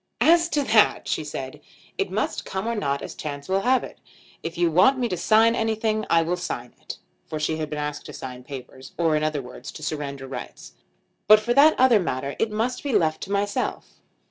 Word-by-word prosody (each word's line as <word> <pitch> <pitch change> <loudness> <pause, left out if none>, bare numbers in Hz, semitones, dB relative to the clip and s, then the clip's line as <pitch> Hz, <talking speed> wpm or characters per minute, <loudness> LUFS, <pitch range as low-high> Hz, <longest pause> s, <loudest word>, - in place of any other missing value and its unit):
"As 335 +1 +5
to 295 -3 +1
that," 220 -3 +3
she - - -1
said, 135 -3 -7 0.3
"it - - -1
must - - -2
come 190 +2 -4
or 235 - 0
not 140 -10 -2
as - - -6
chance 145 -2 -6
will 190 +1 +1
have 255 +4 +2
it. - - -10 0.4
If 165 +1 -6
you 170 -1 +2
want 190 - +5
me 250 -2 0
to 185 - -2
sign 220 +6 +4
anything 220 -1 -1
I 165 0 +4
will 175 +2 -1
sign 125 -8 -5
it;" - - -8 0.3
for 155 - -4
she 155 +1 -1
had 155 -1 -3
been 150 - -4
asked 150 0 -4
to - - -9
sign 125 -1 -8
papers, 130 -1 -10
or 165 -2 +2
in 150 - 0
other 155 -3 -1
words 125 +2 -9
to 155 - -10
surrender 145 -3 -4
rights; 130 - -8 0.5
"but 215 +1 +8
for 235 +3 0
that 295 +4 +6
other 250 -4 +6
matter 140 -5 -3
it 225 - +1
must 225 +4 -2
be 280 -3 -3
left 160 -6 +2
to 195 - -9
myself." 205 0 -2
175 Hz, 220 wpm, -24 LUFS, 145-220 Hz, 0.5 s, but